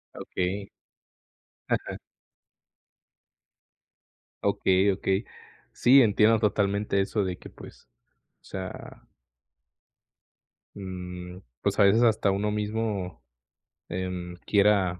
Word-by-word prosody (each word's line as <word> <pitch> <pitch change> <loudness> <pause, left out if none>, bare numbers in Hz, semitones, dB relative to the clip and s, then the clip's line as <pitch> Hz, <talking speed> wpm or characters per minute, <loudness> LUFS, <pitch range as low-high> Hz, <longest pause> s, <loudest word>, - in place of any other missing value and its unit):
Okey. 95 +2 -3 1.0
Ajá. - - -1 2.5
Okey, 100 -1 +3
okey. 95 +2 -1 0.5
Sí, 130 +2 +6
entiendo 110 0 +4
totalmente 100 -1 +1
eso 100 +1 0
de 90 -1 -3
que - - -12
pues, - - -14 0.5
o - - -50
sea 95 -1 -8 1.7
mm, 90 -2 -7 0.2
pues, 100 +1 -1
a 100 - +7
veces 110 +4 +5
hasta 110 -3 +3
uno 105 +2 0
mismo, 105 -3 -3 0.7
em, 90 -1 -4
quiera, 100 -3 +3
100 Hz, 90 wpm, -27 LUFS, 95-105 Hz, 2.5 s, a